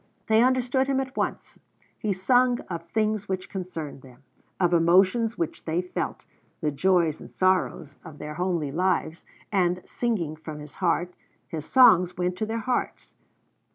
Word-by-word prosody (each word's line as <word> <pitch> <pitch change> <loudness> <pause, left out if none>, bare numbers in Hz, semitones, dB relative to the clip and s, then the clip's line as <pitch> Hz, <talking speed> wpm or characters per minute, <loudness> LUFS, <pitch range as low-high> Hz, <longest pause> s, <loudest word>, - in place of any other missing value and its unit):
They 220 0 +4
understood 255 +1 +2
him 270 -1 +1
at 265 0 -4
once. - - -3 0.4
He 210 - -1
sung 245 +6 +3
of 170 -1 -5
things 215 0 -1
which 185 -1 -3
concerned 165 -7 -6
them, 130 +1 -17 0.4
of 175 -2 +2
emotions 190 +7 +3
which 165 - -3
they 165 +1 0
felt, 180 - -4 0.3
the 150 - 0
joys 170 0 +2
and - - -11
sorrows 185 -5 0
of 160 -3 -11
their 150 0 -6
homely 170 -4 -1
lives, 175 0 -1 0.3
and, 180 -3 +2
singing 195 -11 -2
from 155 -1 -8
his 150 0 -10
heart, 180 0 0 0.4
his 155 -2 -5
songs 185 -9 +6
went 180 0 -1
to 215 - -1
their 225 +1 -2
hearts. 245 +3 -3
180 Hz, 155 wpm, -26 LUFS, 165-220 Hz, 0.4 s, songs